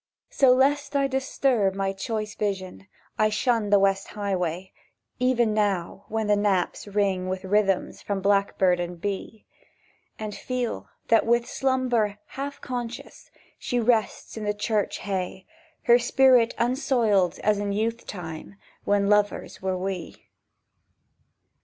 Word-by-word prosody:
So, 265 -2 +5
lest 280 +3 +2
I 280 0 +3
disturb 265 -6 +1
my 195 0 -1
choice 215 +1 -4
vision, 195 -2 -4 0.3
I 215 - +4
shun 215 0 +1
the 205 - +6
West 195 0 +2
Highway, 185 -3 -3 0.5
Even 240 -3 +2
now, 200 -5 -1
when 220 0 -2
the 210 0 +3
knaps 205 -2 0
ring 195 -2 0
with 185 0 -3
rhythms 195 -1 +1
From 200 -1 -2
blackbird 195 -2 +2
and 175 0 -4
bee; 205 +3 -5 0.7
And 215 -1 -5
feel 240 - -4 0.2
that 225 - +5
with 235 0 +2
slumber 250 -6 0
half 280 +1 -6
conscious 245 +1 -6 0.3
She 245 - -1
rests 225 -2 0
in 220 - -5
the 210 0 -1
church 210 0 -1
hay, 190 -1 -4 0.4
Her 240 0 +6
spirit 245 -1 +4
unsoiled 235 - +1
as 210 -1 +2
in 205 0 -2
youth 225 +3 -2
time 170 -1 -7 0.3
When 200 -1 +2
lovers 210 0 +1
were 190 -1 -1
we. 185 -2 -6
210 Hz, 135 wpm, -25 LUFS, 195-240 Hz, 0.7 s, the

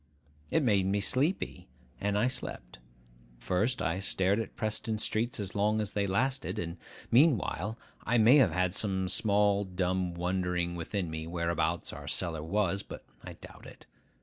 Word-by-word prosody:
It 160 - +2
made 100 -6 +3
me 100 +1 +1
sleepy, 135 - 0 0.3
and 100 0 0
I 105 - +3
slept. - - -6 0.6
First, 105 - 0
I 90 +1 0
stared 95 +1 +1
at 115 - -5
Preston 110 0 -2
streets 110 +2 -1
as 100 -2 -2
long 105 +2 +1
as 105 -1 -2
they 100 -1 0
lasted; 130 +7 0
and, 85 +1 -4 0.3
meanwhile, 115 - +3 0.3
I 120 - +2
may 115 +6 +7
have 130 -8 +6
had 90 +2 0
some 95 -2 0
small 100 +1 +2
dumb 90 -1 -1
wondering 90 0 -1
within 85 0 -3
me 80 0 -5
whereabouts 85 -1 -1
our - - -9
cellar 85 -4 -1
was; 100 +3 0
but - - -10 0.2
I - - -8
doubt - - -13
it. - - -14
100 Hz, 160 wpm, -30 LUFS, 90-110 Hz, 0.6 s, may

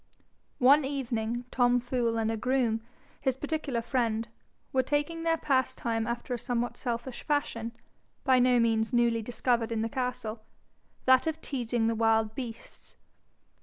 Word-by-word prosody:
One 280 +4 +6
evening, 240 -4 -2
Tom 245 -1 +3
Fool, 240 -2 -1
and 225 0 +1
a - - -1
groom, 235 -1 +1 0.4
his 265 -3 +1
particular 280 -4 -2
friend, 230 -2 0 0.5
were 260 - +4
taking 290 +5 -1
their 330 0 +2
pastime 240 -5 0
after 240 +1 -3
a 240 - -2
somewhat 240 0 -2
selfish 240 +1 -4
fashion, 235 -6 -1 0.5
by 260 -2 +4
no 250 0 +4
means 225 -1 +2
newly 235 -2 +3
discovered 235 0 0
in 225 -1 0
the 225 - -1
castle 245 -3 -3 0.6
that 260 +4 +5
of 320 0 -1
teasing 240 -6 -1
the 230 - +2
wild 225 -1 +2
beasts. 240 -4 -8
240 Hz, 145 wpm, -29 LUFS, 230-260 Hz, 0.6 s, One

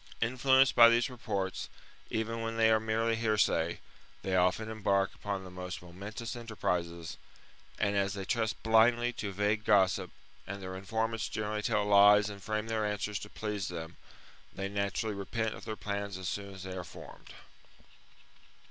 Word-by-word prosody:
Influenced 130 +3 +4
by 115 -1 +9
these 120 +2 +2
reports, 100 -6 -3 0.4
even 115 +1 -2
when 115 0 -3
they 110 0 +5
are 110 - +5
merely 110 +1 0
hearsay, 110 -3 +1 0.4
they 95 -1 0
often 90 +4 +2
embark 100 -3 +1
upon 100 -2 -4
the 90 - -10
most 90 0 -6
momentous 100 +7 -7
enterprises; 90 -8 -3 0.6
and, 100 -1 +1
as 100 0 +1
they 95 -1 -5
trust 110 0 -1
blindly 115 +2 +4
to 105 -3 -4
vague 105 +2 0
gossip, 95 -3 +3 0.4
and 100 +1 -5
their 95 -1 -6
informants 110 +3 -2
generally 105 0 -2
tell 105 0 +1
lies 105 +1 +6
and 100 -1 -10
frame 105 +2 -2
their 110 -1 -1
answers 105 -1 -2
to 105 - -9
please 105 -3 -3
them, 85 -1 -6 0.6
they 95 - -4
naturally 100 +1 -1
repent 110 +3 -2
of - - -10
their 110 - -4
plans 100 -2 -4
as 95 -1 -5
soon 100 +1 -4
as 95 -1 -9
they 95 -1 -6
are 90 - -4
formed. 85 - -12
105 Hz, 165 wpm, -31 LUFS, 95-110 Hz, 0.6 s, by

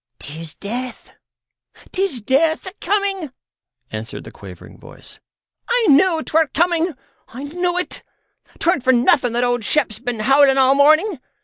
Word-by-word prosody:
"'Tis 160 +2 -9
death, 245 +5 -6 0.8
'tis 375 - -2
death 305 +8 +1
a 375 - -7
coming," 390 -5 -1 0.6
answered - - -7
the - - -11
quavering - - -13
voice; - - -13 0.5
"I - - +2
knew 325 +2 +3
'twere 320 0 +1
coming. 340 -1 +1 0.3
I 255 +4 -9
knew 350 +4 -2
it. 360 - -4 0.6
'Tweren't 340 -4 +1
for 260 - +4
nothing 245 0 +3
that 240 +1 0
old 245 -1 0
Shep's 230 -3 0
been 245 -3 -4
howling 270 +3 +4
all 265 0 +5
morning. 310 +5 +3
285 Hz, 140 wpm, -19 LUFS, 245-350 Hz, 0.8 s, all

